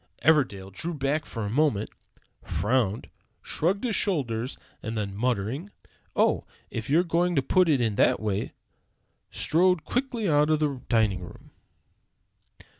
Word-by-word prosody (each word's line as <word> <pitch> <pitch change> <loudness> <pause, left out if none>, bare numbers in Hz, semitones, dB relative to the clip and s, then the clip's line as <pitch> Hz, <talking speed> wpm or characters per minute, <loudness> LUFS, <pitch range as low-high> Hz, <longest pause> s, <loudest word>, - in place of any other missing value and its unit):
Everdell 120 -12 +2
drew 165 - -4
back 145 +2 -1
for 115 -3 -4
a - - -2
moment, 125 -6 +1 0.5
frowned, 105 +4 0 0.4
shrugged 185 +7 0
his 235 -5 0
shoulders, 130 - -1 0.2
and 110 +1 -4
then 100 -2 -3
muttering, 125 - -1 0.5
"Oh, - - +3 0.3
if 110 +1 -5
you're 160 +5 +4
going 175 +1 +1
to 135 - +2
put 180 +5 +3
it 145 -4 +4
in 110 -4 0
that - - +4
way," 105 -2 -2 0.8
strode 180 0 +2
quickly 245 -4 -1
out 150 -1 +3
of 155 -1 +3
the 145 -4 -1
dining 110 -5 +2
room. 90 - -12
135 Hz, 140 wpm, -27 LUFS, 110-165 Hz, 0.8 s, you're